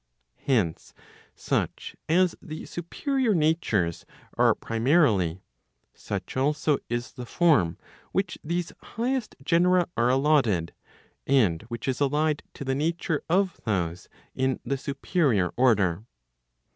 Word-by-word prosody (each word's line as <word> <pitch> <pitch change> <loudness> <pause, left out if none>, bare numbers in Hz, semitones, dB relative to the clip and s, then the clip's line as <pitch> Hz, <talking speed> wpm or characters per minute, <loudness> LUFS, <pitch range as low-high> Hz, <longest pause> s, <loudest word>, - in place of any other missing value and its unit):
Hence, 105 - 0 0.4
such - - -2
as 180 +1 +3
the 155 0 -7
superior 240 - -1
natures 150 - +1 0.3
are - - +4
primarily, 115 - +2 0.5
such - - -6
also 145 +2 +1
is 120 +1 -3
the 125 - -8
form 140 - +3 0.3
which 190 -2 -1
these 170 +2 -2
highest 245 +1 -3
genera 175 +3 +3
are 120 +1 +2
allotted, 130 - +2 0.5
and 110 -12 +3
which 120 0 -6
is 130 +1 -1
allied 150 +2 +1
to 140 - -7
the 135 - 0
nature 160 +2 -1
of 185 +1 +1
those 90 -5 -2 0.2
in 130 0 0
the 140 - 0
superior 135 - 0
order. 105 -7 +2
140 Hz, 115 wpm, -26 LUFS, 110-170 Hz, 0.5 s, are